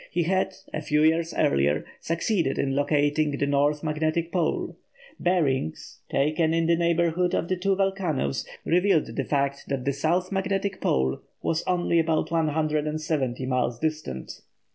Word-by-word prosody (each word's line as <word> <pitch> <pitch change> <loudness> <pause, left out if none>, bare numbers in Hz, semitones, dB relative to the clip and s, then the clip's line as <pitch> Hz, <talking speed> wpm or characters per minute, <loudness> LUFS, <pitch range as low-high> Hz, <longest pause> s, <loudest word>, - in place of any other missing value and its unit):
He 175 - 0
had, 185 +3 0 0.2
a 155 - -2
few 150 0 +2
years 165 +1 +2
earlier, 70 +2 +1
succeeded 165 -2 0
in 135 -1 0
locating 145 +1 +2
the 145 - +1
North 145 +2 +1
Magnetic 155 +2 -1
Pole. 175 -4 -1 0.4
Bearings, 145 - 0
taken 155 +3 +1
in 165 0 +2
the 170 +1 +4
neighbourhood 170 +1 +1
of 170 - -1
the 185 - 0
two 195 +2 +1
volcanoes, 185 - 0 0.2
revealed 180 -1 +2
the 135 - 0
fact 140 0 -1
that 135 -2 -3
the 140 - +1
South 175 +7 0
Magnetic 195 0 -1
Pole 65 0 +1 0.2
was 165 0 0
only 175 -2 +2
about 160 0 +1
170 155 -4 0
miles 125 -2 0
distant. 155 - -4
155 Hz, 145 wpm, -26 LUFS, 140-170 Hz, 0.4 s, the